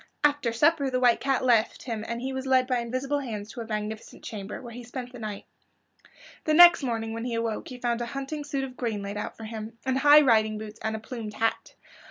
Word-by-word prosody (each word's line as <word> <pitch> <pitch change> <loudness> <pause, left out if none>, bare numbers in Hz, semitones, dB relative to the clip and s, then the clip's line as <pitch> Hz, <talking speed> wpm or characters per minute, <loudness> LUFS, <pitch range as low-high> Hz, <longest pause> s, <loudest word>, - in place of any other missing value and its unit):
After 290 -5 +2
supper 290 +4 +3
the 255 -1 0
White 245 -2 +4
Cat 270 -1 0
left 235 -3 +2
him 225 -4 -4
and 235 0 -3
he 265 +1 -3
was 265 0 -4
led 260 -1 +4
by 250 -1 0
invisible 255 +4 -2
hands 215 -5 -6
to 240 - -7
a 225 - -7
magnificent 215 0 -5
chamber, 205 -2 -6
where 235 -2 -9
he 245 +1 -8
spent 245 +1 -7
the 250 - -10
night. 210 -2 -6 1.0
The 310 - +3
next 345 0 +9
morning 225 -4 -2
when 230 +1 -4
he 240 -2 -2
awoke 230 -1 -2
he 255 - -8
found 240 -1 -1
a 240 - -2
hunting 275 +4 -5
suit 280 -2 -2
of 260 -1 -6
green 225 -5 -3
laid 200 +1 -5
out 210 - -5
for 225 - -9
him, 220 +1 -7
and 260 0 +1
high 295 +2 +8
riding 220 -5 +3
boots 215 0 -8
and 220 0 -2
a - - -4
plumed 220 -1 -7
hat. 225 0 -1
240 Hz, 240 wpm, -27 LUFS, 220-265 Hz, 1.0 s, next